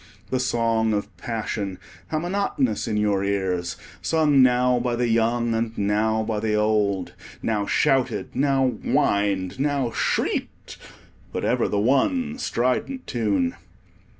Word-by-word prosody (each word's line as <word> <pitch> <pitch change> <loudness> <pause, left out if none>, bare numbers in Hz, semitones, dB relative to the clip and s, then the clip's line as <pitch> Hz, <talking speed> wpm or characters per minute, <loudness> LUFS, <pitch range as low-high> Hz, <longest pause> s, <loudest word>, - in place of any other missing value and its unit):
The 130 - +1
song 115 -3 +1
of 105 +1 -3
passion, 105 -4 -3 0.3
how 155 - -2
monotonous 160 - -1
in 105 - -1
your 105 -2 +1
ears, 95 -3 -1 0.2
sung 150 -4 +3
now 125 0 +4
by 120 0 -1
the 120 0 0
young 115 +1 +1
and 115 0 -2
now 110 +2 +1
by 110 -1 -2
the 105 0 0
old; 105 -3 +1 0.3
now 105 -2 0
shouted, 135 -2 +1
now 135 0 +2
whined, 100 +1 +1
now 140 -4 0
shrieked; - - -2 0.5
but - - -3
ever - - +1
the 105 - -1
one 235 - +1
strident 130 - -1
tune. 100 -7 0
115 Hz, 130 wpm, -24 LUFS, 105-130 Hz, 0.5 s, now